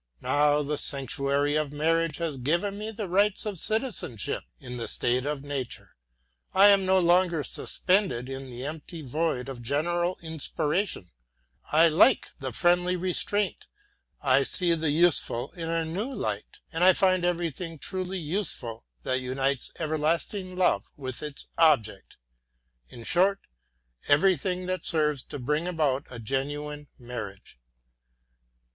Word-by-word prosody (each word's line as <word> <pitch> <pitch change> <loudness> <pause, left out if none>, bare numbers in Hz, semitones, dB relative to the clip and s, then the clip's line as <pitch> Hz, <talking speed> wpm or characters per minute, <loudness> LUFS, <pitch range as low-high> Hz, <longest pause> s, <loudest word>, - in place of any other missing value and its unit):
Now 150 0 +3
the 150 +1 -1
sanctuary 140 +2 +1
of 155 -2 0
marriage 165 +1 +1
has 165 -4 -2
given 170 +10 0
me 210 +2 -5
the 215 -2 -5
rights 200 +4 +2
of 205 -5 -3
citizenship 215 - 0 0.2
in 125 -1 -7
the 115 - -4
state 125 +3 0
of 145 -2 -3
nature. 140 -4 -5 0.6
I 200 +2 +8
am 195 -2 +4
no 190 0 +5
longer 175 -3 +3
suspended 185 - 0
in 135 0 -7
the 125 +1 -7
empty 160 +2 -7
void 135 -1 -1
of 130 -3 -7
general 175 +8 0
inspiration; 160 - -1 0.7
I 160 +2 +6
like 165 +11 +4
the 135 -2 -4
friendly 175 +6 +2
restraint, 185 +3 0 0.6
I 135 -1 +4
see 170 +5 +4
the 160 -2 0
useful 145 -5 +2
in 165 -2 -6
a 165 0 0
new 195 +11 -3
light, 105 - -5
and 180 +3 +5
find 185 -2 +3
everything 170 -1 -2
truly 185 +4 -3
useful 150 - -2 0.2
that 130 0 0
unites 135 +1 -1
everlasting 165 +5 -1
love 185 0 +2
with 130 -3 -5
its 150 -2 -6
object 120 -11 +2 0.7
in 115 - -11
short 195 +8 +3 0.7
everything 180 +3 +2
that 185 -1 -3
serves 150 -4 +1
to - - -7
bring 150 +6 -1
about 150 -6 0
a 125 - -8
genuine 145 +5 -3
marriage. 115 - -8
155 Hz, 135 wpm, -27 LUFS, 135-180 Hz, 0.7 s, I